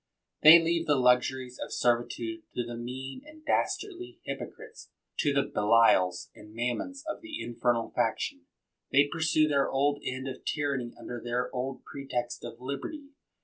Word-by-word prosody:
'* - - -56
They 155 +2 +12
leave 165 0 0
the 145 - +4
luxuries 125 0 +2
of - - -9
servitude 125 - 0
to 120 - -1
the 120 0 -6
mean 130 - -6
and 310 +1 -15
dastardly 365 +1 -1
hypocrites, 450 +1 -8 0.3
to 145 - +3
the 140 -1 +3
Belials 105 -6 +3
and 105 +1 -14
Mammons 125 - -2
of 315 - -4
the 320 -2 -6
infernal 120 -1 0
faction. - - -1 0.4
They 140 +1 +5
pursue 160 -1 +3
their 140 -2 +2
old 145 +1 +1
end 130 +1 -3
of 130 - -7
tyranny 140 -5 -1
under 120 -1 -6
their 120 +2 -2
old 130 +1 -3
pretext 125 -3 -4
of 120 0 -8
liberty. 140 - -5
135 Hz, 155 wpm, -29 LUFS, 120-160 Hz, 0.4 s, They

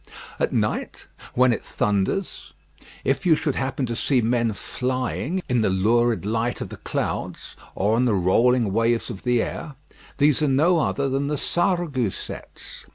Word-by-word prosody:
At - - +1
night, - - -2 0.3
when 125 0 +4
it - - -4
thunders, 105 - -2 0.5
if - - 0
you 170 -4 +5
should 150 -2 -1
happen 130 0 -2
to 120 -1 -3
see 130 +2 +2
men 115 0 +1
flying 130 - -3
in 125 -3 +1
the 110 - +2
lurid 110 +1 +2
light 115 +3 -1
of - - -5
the - - -9
clouds, - - -4 0.2
or 105 +3 +1
on 125 - +3
the 115 -4 +2
rolling 110 +4 +3
waves 115 +1 +1
of 95 - -8
the 125 -2 +2
air, 150 -4 -6 0.4
these 145 0 +4
are 150 - +3
no 160 +6 +3
other 140 -2 0
than 135 +1 -1
the 150 0 -1
Sarregousets. 170 - -2
125 Hz, 160 wpm, -23 LUFS, 115-140 Hz, 0.5 s, you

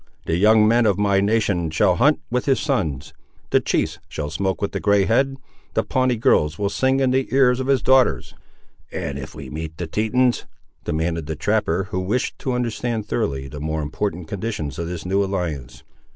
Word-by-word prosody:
The 80 - 0
young 105 +3 +5
men 115 0 +4
of 100 -3 +2
my 100 -1 +2
nation 100 -5 +1
shall 75 - +2
hunt 80 - +3
with 125 0 0
his 135 -2 +3
sons; 80 - -2 0.4
the - - +5
chiefs - - -1
shall 75 -1 -4
smoke 95 +3 -1
with 100 - -2
the - - -3
grey 100 -2 +3
head. 135 +5 +1 0.4
The - - +2
Pawnee 130 -1 +1
girls 80 -8 +2
will 100 -1 -1
sing 130 +3 +1
in 130 -1 +2
the 130 0 +1
ears 125 -1 +4
of 130 - -3
his 135 -4 +2
daughters." 130 -2 +3 0.6
"And 70 0 -4
if 65 - -8
we 70 -4 -8
meet 80 +1 -6
the 90 - -3
Tetons?" 120 +8 +1 0.4
demanded 80 0 -2
the 80 - -3
trapper, 95 0 0
who 90 - -1
wished 105 +8 -2
to 130 - -2
understand, 120 -2 -2
thoroughly, 70 - -2
the 75 +2 -8
more 80 0 -2
important 85 +3 -3
conditions 95 - -4
of 85 - -3
this 85 -1 -6
new 95 +2 +1
alliance. 85 -10 -4
100 Hz, 195 wpm, -22 LUFS, 80-120 Hz, 0.6 s, young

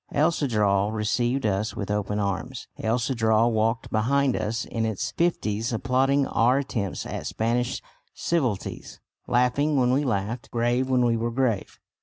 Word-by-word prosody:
El 155 +4 +3
Cedral 105 -9 +1
received 120 +4 0
us 105 +1 0
with 100 -1 -4
open 105 0 -1
arms. 100 +5 -3
El 115 +2 +1
Cedral 115 -2 +2
walked 115 +1 0
behind 130 +4 +2
us 115 +2 -2
in 115 - -3
its 110 -3 -2
fifties, 115 -9 0
applauding 135 +4 +2
our 125 +2 +3
attempts 115 -8 -3
at - - -5
Spanish 120 +3 -1 0.3
civilities, 130 - -2 0.3
laughing 140 +5 +2
when 125 -1 +3
we 140 +3 +2
laughed, 115 -1 -2
grave 120 +2 0
when 125 -1 +3
we 115 -1 +2
were 115 +1 -1
grave. 120 -4 -1
120 Hz, 150 wpm, -25 LUFS, 110-130 Hz, 0.3 s, El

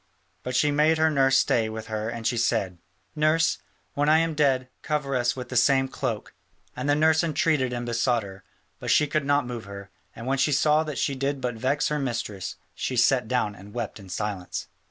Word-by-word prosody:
But 125 0 -4
she 145 +3 +3
made 155 +2 +3
her 160 0 +3
nurse 135 -2 +4
stay 115 -4 +2
with 110 0 -6
her 110 0 -3
and 115 -1 -6
she 125 - +1
said: 105 -6 0 0.4
"Nurse, 155 -3 +2 0.3
when 145 +1 +1
I 155 - +6
am 165 0 +1
dead, 135 -4 +2
cover 150 -3 -1
us 120 -1 +1
with 125 -2 -7
the 130 - -6
same 135 +2 +4
cloak." 125 -5 -4 0.4
And 130 +3 -3
the 145 - +4
nurse 160 +2 +3
entreated 150 -5 +1
and 120 -1 -3
besought 120 0 +1
her, 95 -1 -11 0.4
but - - -5
she 150 - +5
could 150 0 -1
not 145 0 +2
move 120 -3 -6
her, 100 0 -9 0.2
and 115 - -8
when 135 +1 0
she 150 +2 +2
saw 150 +2 +3
that 150 -3 -5
she 140 - 0
did 135 +1 -2
but 125 -1 -2
vex 130 +6 0
her 150 0 -1
mistress, 115 -7 -3 0.2
she 130 - -3
sat 120 0 +3
down 110 -4 0
and 100 +2 -13
wept 115 -3 -4
in 95 -2 -13
silence. 95 -1 -4
130 Hz, 215 wpm, -26 LUFS, 115-145 Hz, 0.4 s, I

